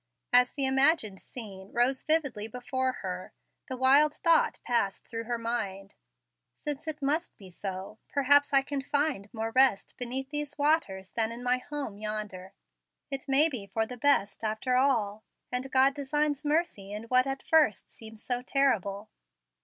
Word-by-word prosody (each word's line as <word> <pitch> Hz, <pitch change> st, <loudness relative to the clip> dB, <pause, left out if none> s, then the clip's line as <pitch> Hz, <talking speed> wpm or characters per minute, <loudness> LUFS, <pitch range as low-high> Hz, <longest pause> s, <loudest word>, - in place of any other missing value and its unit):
As 250 Hz, 0 st, +6 dB
the 280 Hz, -2 st, +1 dB
imagined 265 Hz, -, +3 dB
scene 195 Hz, -5 st, -9 dB
rose 250 Hz, +3 st, +2 dB
vividly 280 Hz, -9 st, +2 dB
before 250 Hz, +2 st, -2 dB
her, 185 Hz, -1 st, -5 dB, 0.3 s
the 260 Hz, -, -4 dB
wild 280 Hz, +4 st, +5 dB
thought 335 Hz, -1 st, +2 dB
passed 230 Hz, -5 st, -1 dB
through 230 Hz, 0 st, -5 dB
her 240 Hz, +1 st, -2 dB
mind: 205 Hz, -4 st, -4 dB, 0.6 s
"Since 295 Hz, +1 st, -4 dB
it 300 Hz, -2 st, -5 dB
must 305 Hz, +5 st, -1 dB
be 190 Hz, -3 st, -13 dB
so, 190 Hz, +3 st, -6 dB
perhaps 285 Hz, +1 st, +4 dB
I 275 Hz, -1 st, +5 dB
can 280 Hz, 0 st, -3 dB
find 285 Hz, -7 st, -1 dB
more 225 Hz, 0 st, -4 dB
rest 255 Hz, -4 st, +2 dB
beneath 260 Hz, +3 st, -4 dB
these 295 Hz, -1 st, -4 dB
waters 285 Hz, -, 0 dB
than 225 Hz, -1 st, 0 dB
in 235 Hz, +1 st, -7 dB
my 250 Hz, 0 st, +1 dB
home 270 Hz, -7 st, -6 dB
yonder. 210 Hz, -3 st, -5 dB, 0.6 s
It 275 Hz, 0 st, -4 dB
may 280 Hz, +4 st, +5 dB
be 245 Hz, -10 st, -6 dB
for 220 Hz, +3 st, -1 dB
the 250 Hz, -, -8 dB
best, 235 Hz, -6 st, +1 dB
after 220 Hz, +4 st, -1 dB
all, 225 Hz, -6 st, +1 dB, 0.3 s
and 255 Hz, +2 st, -2 dB
God 265 Hz, +1 st, +4 dB
designs 290 Hz, +1 st, -1 dB
mercy 295 Hz, -, -1 dB
in 210 Hz, +1 st, -6 dB
what 255 Hz, +3 st, +2 dB
at 270 Hz, 0 st, -4 dB
first 305 Hz, -10 st, +2 dB
seemed 220 Hz, -1 st, -12 dB
so 245 Hz, +2 st, -2 dB
terrible." 220 Hz, -7 st, 0 dB
250 Hz, 160 wpm, -29 LUFS, 215-280 Hz, 0.6 s, As